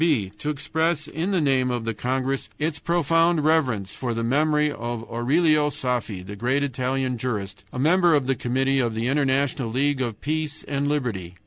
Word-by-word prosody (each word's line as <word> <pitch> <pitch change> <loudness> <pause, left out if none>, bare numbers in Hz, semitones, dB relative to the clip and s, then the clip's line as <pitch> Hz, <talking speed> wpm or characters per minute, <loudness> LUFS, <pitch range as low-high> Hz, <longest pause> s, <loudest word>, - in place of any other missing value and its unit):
"b. 135 - +2
To 150 - -2
express 155 +1 -1
in 165 +5 -3
the 190 -3 +2
name 135 -4 +2
of 120 -2 -2
the 115 - -1
congress 130 +4 -2
its 150 0 -2
profound 165 0 +2
reverence 130 -12 +1
for 120 -3 -3
the 115 - -2
memory 150 +4 +2
of 120 -3 -4
Aurelio 150 +5 +2
Saffi, 120 -9 -2
the 105 +2 -7
great 130 +6 0
Italian 130 -1 -1
jurist, 100 -5 -4
a - - -7
member 170 +4 +4
of 140 -3 +1
the 135 - +2
committee 135 +2 0
of 120 -3 0
the 115 +1 -1
International 135 -2 +1
League 135 +3 0
of 115 -4 -3
Peace 155 0 -2
and 140 0 -2
Liberty. 115 -12 -2
135 Hz, 185 wpm, -24 LUFS, 120-150 Hz, -, member